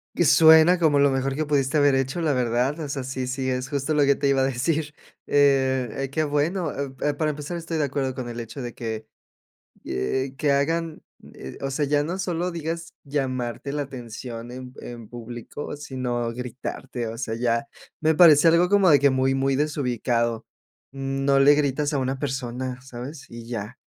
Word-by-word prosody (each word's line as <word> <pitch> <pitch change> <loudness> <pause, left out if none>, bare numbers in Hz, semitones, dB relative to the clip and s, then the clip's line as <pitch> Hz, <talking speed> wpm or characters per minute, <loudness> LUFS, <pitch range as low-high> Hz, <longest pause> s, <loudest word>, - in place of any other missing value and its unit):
Que 175 - +3
suena 160 +2 +7
como 155 -4 +3
lo 140 0 +5
mejor 135 0 -1
que 155 - -1
pudiste 140 -1 +1
haber 145 -2 +4
hecho, 135 +5 0
la 155 - +1
verdad. 125 +3 0
O 155 - -4
sea, 140 -1 -4
sí, 130 0 -4
sí, 130 0 -2
es 125 0 -2
justo 140 +2 -1
lo 150 -1 +4
que 140 0 +4
te 140 - 0
iba 135 -1 +3
a - - +3
decir. 145 +4 -1 0.3
Eh, 135 -2 +2
qué 155 +2 0
bueno. 155 +3 0
Eh, 140 0 -4
pa 145 +2 -2
para 155 0 +1
empezar, 150 +4 -5
estoy 165 -1 -4
de 155 - +1
acuerdo 135 -2 -2
con 125 -2 -5
el 120 0 -6
hecho 120 +4 -7
de 120 -1 -5
que, 110 -2 -5 0.8
eh, 130 - -2
que 150 - -1
rhagan, 160 +3 0 0.3
eh, 65 - -9
o 135 - -2
sea, 145 +2 0
ya 145 +1 +2
no 170 +5 -3
solo 180 -1 -1
digas 165 0 -5
llamarte 135 -2 -3
la 145 - -1
atención 120 -2 -8
en 125 0 -8
en 115 -3 -9
público, 120 +5 -7
sino 125 -4 -3
gritarte. 125 0 -5
O 115 +1 -5
sea, 115 -1 -3
ya 115 +2 0 0.3
me 160 0 +2
parece 160 -2 +7
algo 170 +2 +4
como 200 -2 +5
de 145 - +7
que 140 0 +4
muy, 130 0 +1
muy 135 0 +1
desubicado. 125 -5 -1 0.4
Mm, 135 0 -3
no 140 -1 +4
le 140 +2 +7
gritas 145 +1 0
a 145 - 0
una 130 +1 -1
persona, 130 -2 -4
¿sabes? 135 +3 -8
Y 115 0 -10
ya. 115 0 -6
135 Hz, 195 wpm, -24 LUFS, 125-150 Hz, 0.8 s, suena